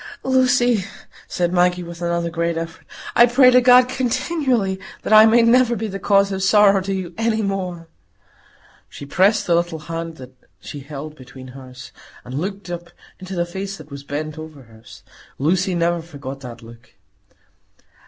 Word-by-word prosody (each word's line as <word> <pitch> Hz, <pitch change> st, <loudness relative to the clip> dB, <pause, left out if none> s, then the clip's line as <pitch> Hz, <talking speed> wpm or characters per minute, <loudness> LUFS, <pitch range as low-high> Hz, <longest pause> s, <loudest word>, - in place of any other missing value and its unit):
"Lucy," 250 Hz, -4 st, +2 dB, 0.4 s
said 175 Hz, 0 st, -1 dB
Maggie, 180 Hz, 0 st, +2 dB
with 170 Hz, 0 st, -10 dB
another 170 Hz, -1 st, -1 dB
great 170 Hz, 0 st, -2 dB
effort, 165 Hz, 0 st, -7 dB, 0.3 s
"I 240 Hz, -, +7 dB
pray 255 Hz, +1 st, +5 dB
to 250 Hz, 0 st, +5 dB
God 250 Hz, 0 st, +6 dB
continually 255 Hz, -, -1 dB, 0.2 s
that -, -, 0 dB
I 215 Hz, +1 st, +9 dB
may 230 Hz, +1 st, +4 dB
never 240 Hz, +1 st, +4 dB
be 225 Hz, +1 st, -4 dB
the 195 Hz, -2 st, -5 dB
cause 200 Hz, 0 st, +2 dB
of 190 Hz, 0 st, -3 dB
sorrow 195 Hz, 0 st, +4 dB
to 195 Hz, +1 st, -4 dB
you 185 Hz, -3 st, -4 dB
any 225 Hz, -1 st, 0 dB
more." 185 Hz, -4 st, -4 dB, 1.0 s
She 140 Hz, -, -10 dB
pressed 200 Hz, +8 st, +2 dB
the 175 Hz, -, +1 dB
little 170 Hz, -1 st, 0 dB
hand 165 Hz, +1 st, -6 dB
that 130 Hz, -3 st, -12 dB, 0.3 s
she 145 Hz, -, -9 dB
held 145 Hz, +2 st, -8 dB
between 130 Hz, -1 st, -13 dB
hers, 130 Hz, -1 st, -12 dB, 0.3 s
and 125 Hz, -, -9 dB
looked 195 Hz, +1 st, -5 dB
up 175 Hz, 0 st, -7 dB, 0.3 s
into 185 Hz, +1 st, -7 dB
the 175 Hz, 0 st, 0 dB
face 195 Hz, +3 st, -6 dB
that 155 Hz, -1 st, -14 dB
was 140 Hz, 0 st, -8 dB
bent 155 Hz, +2 st, -5 dB
over 155 Hz, -3 st, -10 dB
hers. 110 Hz, -1 st, -16 dB, 0.3 s
Lucy 180 Hz, +6 st, 0 dB
never 170 Hz, 0 st, 0 dB
forgot 140 Hz, -4 st, -9 dB
that 120 Hz, -3 st, -10 dB
look. 115 Hz, 0 st, -16 dB
175 Hz, 170 wpm, -20 LUFS, 155-210 Hz, 1.0 s, I